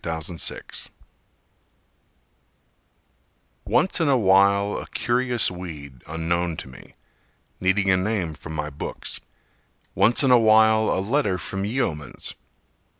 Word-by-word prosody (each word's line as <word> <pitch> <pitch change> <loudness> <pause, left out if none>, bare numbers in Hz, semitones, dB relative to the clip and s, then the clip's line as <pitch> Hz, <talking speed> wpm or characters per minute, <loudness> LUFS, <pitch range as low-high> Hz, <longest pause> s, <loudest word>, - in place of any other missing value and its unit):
William 80 +1 -4
Jones - - -4 2.8
Once 190 - +2
in 160 - +2
a 135 - +4
while 100 -1 +3
a - - -8
curious 120 -2 0
weed 75 -8 -9
unknown 85 +1 -2
to - - -7
me, 65 - -15 0.6
Needing 95 +1 +2
a 95 - +4
name 95 -4 -1
from 80 +1 -9
my 75 0 -3
books; 70 - -5 0.7
Once 120 +5 +3
in 135 - +4
a 125 - +7
while 110 0 +5
a - - +1
letter 115 -5 +1
from 95 +3 -3
Yeomans. 80 - -3
95 Hz, 120 wpm, -23 LUFS, 80-110 Hz, 2.8 s, a